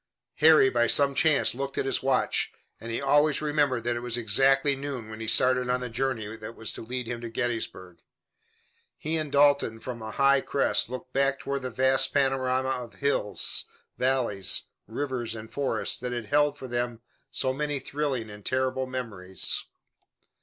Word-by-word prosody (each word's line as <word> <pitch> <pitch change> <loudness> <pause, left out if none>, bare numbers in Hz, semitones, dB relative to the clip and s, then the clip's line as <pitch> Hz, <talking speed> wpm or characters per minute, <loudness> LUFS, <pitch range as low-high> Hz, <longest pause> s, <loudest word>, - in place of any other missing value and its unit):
Harry 155 -3 +7
by 120 -2 +2
some 140 +3 +5
chance 155 0 +3
looked 135 +2 -5
at - - 0
his 135 - +1
watch, 130 -1 +1 0.3
and 115 +1 -7
he 115 - -1
always 145 +2 +3
remembered 145 -5 +1
that 120 0 0
it - - -2
was 120 0 -2
exactly 135 +5 +3
noon 135 -5 -6
when 110 - -8
he 110 - -5
started 125 +2 +2
on 125 0 +1
the 125 0 -5
journey 115 -3 -2
that 110 +1 -9
was 110 - -4
to - - -8
lead 125 +2 -4
him 120 0 -5
to 120 - -5
Gettysburg. 110 -7 -4 1.0
He 155 +1 -3
and 155 -3 -2
Dalton 140 -5 +3
from 120 -1 -7
a 110 - -6
high 140 +4 +3
crest 135 -5 +1
looked 125 0 -7
back 135 0 +2
toward 140 0 -3
the 130 - -4
vast 130 +2 +2
panorama 130 -1 +1
of 125 -3 -4
hills, 140 -7 -1 0.3
valleys, 120 -8 +1 0.2
rivers 125 -5 -3
and 110 0 -10
forest 140 -1 -1
that 125 -1 -3
had 120 -2 -4
held 145 +3 +2
for 130 - -8
them 120 -1 -3 0.3
so 130 0 0
many 145 +1 -2
thrilling 135 -4 -3
and 105 0 -11
terrible 130 +1 -1
memories. 105 -8 -2
130 Hz, 175 wpm, -27 LUFS, 115-140 Hz, 1.0 s, Harry